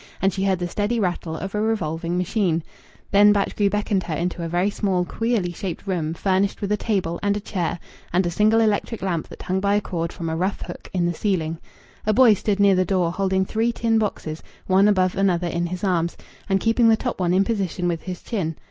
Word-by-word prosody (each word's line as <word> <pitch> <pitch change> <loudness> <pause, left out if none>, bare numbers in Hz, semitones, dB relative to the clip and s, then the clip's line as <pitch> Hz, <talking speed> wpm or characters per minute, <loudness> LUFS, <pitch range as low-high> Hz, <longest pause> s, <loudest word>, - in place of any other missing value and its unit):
And 195 -1 +2
she 190 - -2
heard 190 -1 +2
the 175 0 -3
steady 210 +6 -1
rattle 175 -4 -2
of 195 +4 -5
a 210 - 0
revolving 175 -6 -1
machine. 180 -3 0 0.5
Then 205 +1 +7
Batchgrew 205 0 +1
beckoned 205 -1 0
her 160 - -2
into 170 +1 -2
a - - -2
very 175 +4 +1
small, 190 -4 0
queerly 225 -4 -1
shaped 175 +1 -5
room 165 -5 -2
furnished 195 +2 +1
with 200 0 -3
a - - +4
table 190 -6 -1
and 205 0 +1
a - - -2
chair 180 -5 -2 0.3
and 180 +2 +2
a 175 - -1
single 215 +5 +3
electric 215 0 0
lamp 175 -4 -1
that - - -11
hung 185 +1 0
by 200 +1 +2
a - - +4
cord 170 -4 -3
from 165 - -6
a 160 - -1
rough 185 +4 -1
hook - - -9
in 180 -2 0
the 175 - 0
ceiling. 165 -3 -1 0.5
A 215 - +4
boy 240 -1 +7
stood 205 0 -1
near 200 -1 +6
the 185 0 +3
door 180 -2 +1
holding 190 +1 0
three 225 +4 0
tin 230 -1 +1
boxes 165 -7 -3 0.2
one 195 +2 +4
above 185 -3 +2
another 185 -3 +1
in 170 0 -1
his 180 +2 -6
arms, 170 -3 0 0.3
and 195 0 +3
keeping 225 +1 +3
the 220 - +5
top 250 -3 -3
one 175 -2 +1
in 190 +2 +4
position 190 -5 -1
with 170 -2 -1
his 185 -2 -7
chin. 170 -9 -2
190 Hz, 230 wpm, -23 LUFS, 175-205 Hz, 0.5 s, Then